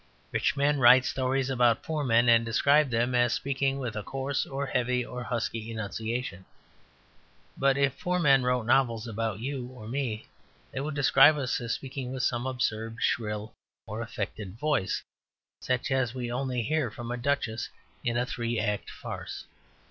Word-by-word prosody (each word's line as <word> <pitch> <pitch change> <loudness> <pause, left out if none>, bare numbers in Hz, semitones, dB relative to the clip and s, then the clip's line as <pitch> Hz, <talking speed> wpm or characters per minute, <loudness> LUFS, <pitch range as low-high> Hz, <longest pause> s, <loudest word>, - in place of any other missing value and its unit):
Rich - - +1
men 145 +1 +2
write 130 +1 +7
stories 135 0 0
about 120 -3 +3
poor 155 -2 -2
men, 120 -2 +4
and 115 -1 +6
describe 140 +6 +3
them 120 +1 +1
as 120 -1 +3
speaking 135 0 0
with 125 -4 -4
a 105 - -2
coarse, 135 +5 -2
or 140 +1 -3
heavy, 125 -2 0
or 125 0 -6
husky 115 -2 -3
enunciation. 110 -1 -4 1.1
But 135 0 +2
if 140 -1 +1
poor 180 0 0
men 140 -6 +5
wrote 125 -1 +1
novels 120 -2 +2
about 110 -2 -3
you 130 -1 -3
or 125 -4 -11
me 120 -3 -3 0.5
they - - -4
would 145 +2 -3
describe 145 +1 +6
us 135 -2 -1
as 115 -1 -2
speaking 130 -2 -6
with 130 -1 -3
some 120 +1 0
absurd 115 -3 -2
shrill 105 -2 -1 0.3
and 110 +2 -4
affected 105 -3 -5
voice, 135 -8 0 0.6
such 130 +2 -1
as 130 -2 +1
we 120 -2 -3
only 125 -1 -1
hear 150 0 0
from 120 +2 -7
a - - -1
duchess 120 -3 -1 0.3
in 120 0 0
a 120 - +1
three 120 -2 -2
act 105 -1 -1
farce. - - -7
125 Hz, 170 wpm, -28 LUFS, 115-135 Hz, 1.1 s, write